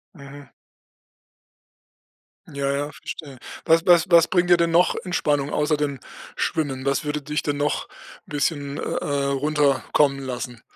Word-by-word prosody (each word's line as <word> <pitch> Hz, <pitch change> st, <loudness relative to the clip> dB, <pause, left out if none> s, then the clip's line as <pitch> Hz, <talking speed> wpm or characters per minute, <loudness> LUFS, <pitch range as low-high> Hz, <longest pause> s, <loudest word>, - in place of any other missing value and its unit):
Mhm. 140 Hz, -1 st, -12 dB, 2.1 s
Ja, 140 Hz, 0 st, -1 dB
ja, 145 Hz, +1 st, -2 dB
verstehe. 140 Hz, -3 st, -9 dB, 0.3 s
Was 165 Hz, +1 st, +3 dB
was 175 Hz, -2 st, +6 dB
was 170 Hz, -1 st, +7 dB
bringt 180 Hz, -1 st, +1 dB
dir 175 Hz, -, +7 dB
denn 170 Hz, 0 st, +2 dB
noch 170 Hz, +2 st, +3 dB
Entspannung, 145 Hz, -6 st, 0 dB
außer 150 Hz, 0 st, +1 dB
dem 145 Hz, -2 st, -2 dB, 0.4 s
Schwimmen? 135 Hz, -5 st, -2 dB
Was 140 Hz, -1 st, 0 dB
würde 150 Hz, 0 st, -3 dB
dich 150 Hz, +2 st, -2 dB
denn 145 Hz, -1 st, -2 dB
noch 145 Hz, +1 st, -1 dB, 0.4 s
'n -, -, -19 dB
bisschen, 145 Hz, -1 st, -2 dB
äh, -, -, -5 dB
äh, 140 Hz, -1 st, -2 dB
runterkommen 140 Hz, 0 st, +1 dB
lassen? 125 Hz, -3 st, -6 dB
145 Hz, 145 wpm, -23 LUFS, 140-155 Hz, 2.1 s, was